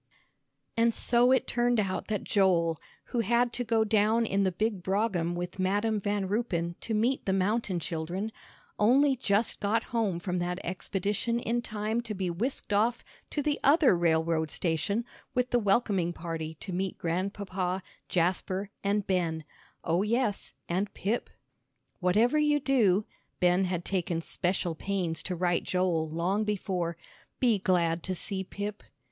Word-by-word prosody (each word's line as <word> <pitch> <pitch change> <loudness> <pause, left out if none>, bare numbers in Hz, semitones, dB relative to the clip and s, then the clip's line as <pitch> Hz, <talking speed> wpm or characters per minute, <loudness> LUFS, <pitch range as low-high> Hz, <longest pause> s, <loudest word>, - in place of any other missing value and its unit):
And 230 0 +3
so 245 +1 +4
it 260 - +3
turned 240 -1 +1
out 195 -3 -1
that 210 -2 -2
Joel, 170 -6 +2 0.3
who 240 - +1
had 235 +2 +2
to 245 - -1
go 225 -1 +2
down 220 +2 +3
in 200 -2 +1
the 190 -1 +2
big 210 +1 -1
brougham 190 -3 0
with 175 +2 -5
Madam 205 +3 +1
Van 205 -1 -1
Ruypen 185 -5 -1
to 225 - -2
meet 240 +4 +1
the 190 - +2
mountain 195 -1 0
children, 175 +6 -3 0.5
only 270 +6 +5
just 220 -3 +1
got 220 +3 +1
home 215 -7 +1
from 180 +1 -2
that 175 0 -2
expedition 200 +5 -1
in 240 0 -1
time 220 0 -2
to 220 -3 -5
be 185 -2 -1
whisked 215 +4 -2
off 225 +4 +2 0.3
to 295 - -2
the 295 0 0
other 285 - +6
railroad 160 -1 +1
station 185 +9 0 0.3
with 250 0 +1
the 245 - +4
welcoming 195 -5 +2
party 160 -2 -5
to 190 - -5
meet 190 +1 -2
Grandpapa, 185 +1 -2 0.3
Jasper, 185 +3 0
and 200 0 +1
Ben 170 -4 0 0.4
oh, 170 +2 +1
yes, 220 0 0 0.2
and 190 +4 -1
Pip! 215 +5 -1 0.7
"Whatever 215 +11 +3
you 295 -1 +3
do," 215 -8 +3 0.3
Ben 180 +1 +3
had 180 -1 -2
taken 175 -3 -1
special 175 +1 -1
pains 170 -2 -1
to 180 - -3
write 175 0 +1
Joel 175 -4 0
long 180 +6 0
before, 185 -5 -2 0.4
"be 235 -5 +3
glad 170 -3 +1
to 185 +2 -3
see 190 +2 -3
Pip." 205 +2 -5
195 Hz, 155 wpm, -29 LUFS, 175-225 Hz, 0.7 s, other